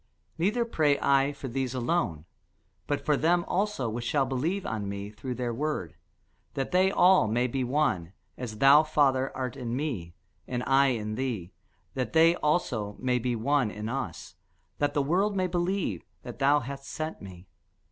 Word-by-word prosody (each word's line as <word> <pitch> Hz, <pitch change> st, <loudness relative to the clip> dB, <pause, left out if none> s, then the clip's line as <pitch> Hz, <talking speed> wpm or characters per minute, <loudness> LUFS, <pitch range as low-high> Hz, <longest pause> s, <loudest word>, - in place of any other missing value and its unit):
Neither 215 Hz, +7 st, +1 dB
pray 150 Hz, -10 st, +2 dB
I 140 Hz, 0 st, +3 dB
for 140 Hz, -1 st, -7 dB
these 130 Hz, 0 st, -2 dB
alone, 120 Hz, -, -1 dB, 0.6 s
but 145 Hz, -, -2 dB
for 150 Hz, -, +3 dB
them 175 Hz, +4 st, +2 dB
also 195 Hz, -, -1 dB
which 115 Hz, +2 st, -3 dB
shall 135 Hz, +3 st, +1 dB
believe 155 Hz, +10 st, -2 dB
on 105 Hz, -3 st, -3 dB
me 100 Hz, +1 st, -5 dB
through 125 Hz, +4 st, -6 dB
their 120 Hz, -1 st, -2 dB
word; 130 Hz, -, -3 dB, 0.6 s
that 135 Hz, -2 st, -2 dB
they 185 Hz, +1 st, +4 dB
all 185 Hz, -, +5 dB
may 120 Hz, +3 st, +1 dB
be 130 Hz, +1 st, -1 dB
one; 120 Hz, -, 0 dB, 0.2 s
as 115 Hz, -4 st, -6 dB
thou, 140 Hz, +5 st, +7 dB
Father, 140 Hz, -4 st, +2 dB
art 130 Hz, -1 st, -3 dB
in 120 Hz, -3 st, -4 dB
me, 115 Hz, -, -4 dB, 0.3 s
and 125 Hz, -1 st, -2 dB
I 135 Hz, +1 st, +4 dB
in 110 Hz, -4 st, -1 dB
thee, 110 Hz, -8 st, -3 dB, 0.4 s
that 130 Hz, -1 st, -3 dB
they 165 Hz, +1 st, +6 dB
also 120 Hz, -10 st, 0 dB
may 125 Hz, -1 st, 0 dB
be 125 Hz, 0 st, -1 dB
one 125 Hz, +1 st, +1 dB
in 105 Hz, +1 st, -5 dB
us: 115 Hz, -, -5 dB, 0.4 s
that 145 Hz, 0 st, 0 dB
the 145 Hz, -, +2 dB
world 190 Hz, +8 st, +1 dB
may 185 Hz, -1 st, +1 dB
believe 175 Hz, -, -1 dB, 0.2 s
that -, -, -9 dB
thou 145 Hz, +2 st, +4 dB
hast 135 Hz, +2 st, -7 dB
sent 155 Hz, +2 st, -5 dB
me. 95 Hz, -2 st, -11 dB
135 Hz, 175 wpm, -28 LUFS, 115-155 Hz, 0.6 s, thou